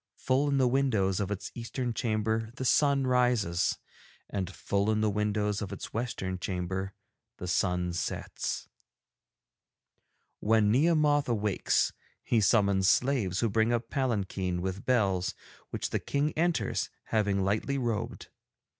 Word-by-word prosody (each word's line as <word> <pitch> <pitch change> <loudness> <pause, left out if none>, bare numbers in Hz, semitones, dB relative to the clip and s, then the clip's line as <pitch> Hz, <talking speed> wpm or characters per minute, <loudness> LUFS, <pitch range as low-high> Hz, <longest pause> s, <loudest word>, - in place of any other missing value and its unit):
Full 135 +3 +1
in 140 - +2
the 130 -2 +4
windows 115 -8 +1
of 100 -2 -1
its 100 -2 -4
eastern 120 +1 -3
chamber 110 0 -1
the 130 - -4
sun 140 0 +3
rises, 125 -9 +2 0.5
and 95 -3 -2
full 100 +2 -1
in 110 0 +1
the 110 -1 +2
windows 105 0 0
of 100 - -4
its - - -7
western 105 -6 -3
chamber 95 +1 -3 0.4
the 90 - -6
sun 90 -1 0
sets. 85 - -3 1.7
'When 105 -1 +3
Nehemoth 145 0 +3
awakes 105 -4 +1 0.3
he 115 - +2
summons 100 -2 +3
slaves 120 -10 +2
who 115 - +3
bring 110 +2 +2
a 120 - +2
palanquin 100 -9 -2
with 95 +3 -4
bells, 100 -7 +1 0.3
which - - -3
the - - 0
King 145 +2 0
enters, 170 +2 0
having 100 -3 +1
lightly 110 +8 0
robed. 115 -5 -3
110 Hz, 135 wpm, -29 LUFS, 95-125 Hz, 1.7 s, the